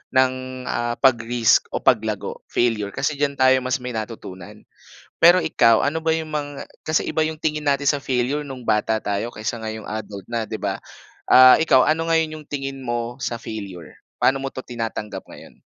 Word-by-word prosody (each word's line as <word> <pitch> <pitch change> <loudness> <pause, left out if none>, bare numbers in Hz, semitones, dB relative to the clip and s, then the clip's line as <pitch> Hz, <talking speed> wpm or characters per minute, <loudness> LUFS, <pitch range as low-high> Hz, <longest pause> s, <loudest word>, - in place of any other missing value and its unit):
ng 130 0 0
ah, 120 0 -1
pag-risk 120 -3 +3
o - - -3
paglago, - - 0
failure. 110 -4 0
Kasi 150 -2 -2
diyan 145 -1 0
tayo 130 -1 +4
mas 130 0 -2
may 125 - -4
natutunan. 110 -5 -8 0.6
Pero 175 +1 +6
ikaw, 115 -7 +4
ano 150 +3 0
ba 160 0 +1
'yong 160 -1 -5
mga 145 -1 -3 0.4
kasi 155 - +2
iba - - -3
'yong 160 - -4
tingin 150 -1 -1
natin 140 0 +2
sa 145 - -3
failure 135 +2 -1
no'ng 130 -2 -8
bata 110 0 0
tayo 105 +4 -3
kaysa 110 +2 -4
ngayong 110 -1 -6 0.2
adult 100 -2 -9
na, 115 -2 -2
'di - - -5
ba? - - -3 0.4
Ah, 130 0 +8
ikaw, 155 -5 +4
ano 165 +1 +1
ngayon 160 -1 +1
'yong 155 -1 -11
tingin 135 -2 -4
mo 120 -1 -3
sa 115 - -3
failure? 100 -8 -8 0.2
Paano 135 0 +2
mo 135 - -3
'to - - -7
tinatanggap 115 -5 -5
ngayon? - - -14
130 Hz, 185 wpm, -22 LUFS, 115-145 Hz, 0.6 s, Ah